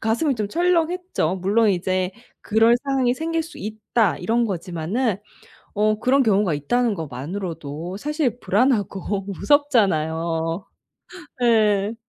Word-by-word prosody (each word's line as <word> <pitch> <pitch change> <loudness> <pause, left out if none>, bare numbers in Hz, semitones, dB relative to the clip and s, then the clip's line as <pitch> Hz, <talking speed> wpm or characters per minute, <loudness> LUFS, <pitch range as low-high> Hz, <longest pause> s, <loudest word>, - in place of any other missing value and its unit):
가슴이 245 +6 +1
좀 210 -3 -3
철렁했죠. 345 - 0
물론 205 +4 +2
이제 185 0 -1 0.3
'그럴 225 +2 +4
상황이 260 -3 +1
생길 325 +2 -2
수 325 +2 -11
있다.' 215 -5 -1
이런 230 +6 +1
거지만은 190 +3 -2 0.6
어 215 +1 +2
그런 265 +4 +3
경우가 205 - +2
있다는 230 - 0
것만으로도 165 +2 -6
사실 295 -3 -1
불안하고 200 -4 0
무섭잖아요. 170 - +1 0.8
예. 215 -3 +3
210 Hz, 270 characters per minute, -22 LUFS, 180-250 Hz, 0.8 s, 그럴